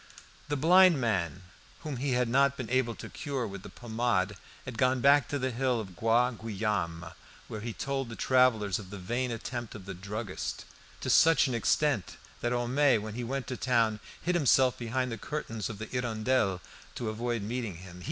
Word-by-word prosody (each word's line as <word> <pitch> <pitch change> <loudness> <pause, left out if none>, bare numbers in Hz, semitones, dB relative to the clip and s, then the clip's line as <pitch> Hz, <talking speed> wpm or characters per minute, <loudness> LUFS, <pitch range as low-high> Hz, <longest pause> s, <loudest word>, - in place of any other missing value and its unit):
The 145 - 0
blind 175 +2 +6
man, 95 - -1 0.4
whom 150 -5 -4
he 135 +1 -1
had 125 0 +2
not 140 +3 +3
been 125 -3 -5
able 130 -3 +1
to - - -8
cure 140 -5 -3
with 100 -2 -7
the - - -10
pomade, 110 -4 -1 0.3
had 125 -4 -7
gone 130 0 +3
back 140 +1 +5
to 145 - -2
the 130 -1 -1
hill 125 0 0
of 95 -5 -7
Bois 115 +5 +3
Guillaume, 100 -7 -3 0.4
where 105 - -6
he 115 +1 -4
told 135 +1 -3
the 115 - -7
travellers 115 -8 +3
of 95 -3 -10
the 100 - -7
vain 120 +7 -2
attempt 120 0 -5
of 100 -3 -9
the 100 - -5
druggist, 100 +2 -5 0.4
to - - -3
such 165 -3 +6
an 130 - -1
extent, 120 -1 +1 0.2
that 120 - -1
Homais 125 +2 +3
when 105 0 -5
he 120 +2 -4
went 135 +2 -3
to 130 - -5
town 115 -4 +2 0.2
hid 180 - -1
himself 135 -6 +4
behind 125 +1 -2
the 115 - -5
curtains 115 -8 -4
of 110 - -6
the 110 - -5
"Hirondelle" 110 -5 0 0.3
to 115 - -3
avoid 115 0 -2
meeting 115 -3 -3
him. 90 +1 -11
120 Hz, 190 wpm, -30 LUFS, 105-130 Hz, 0.4 s, blind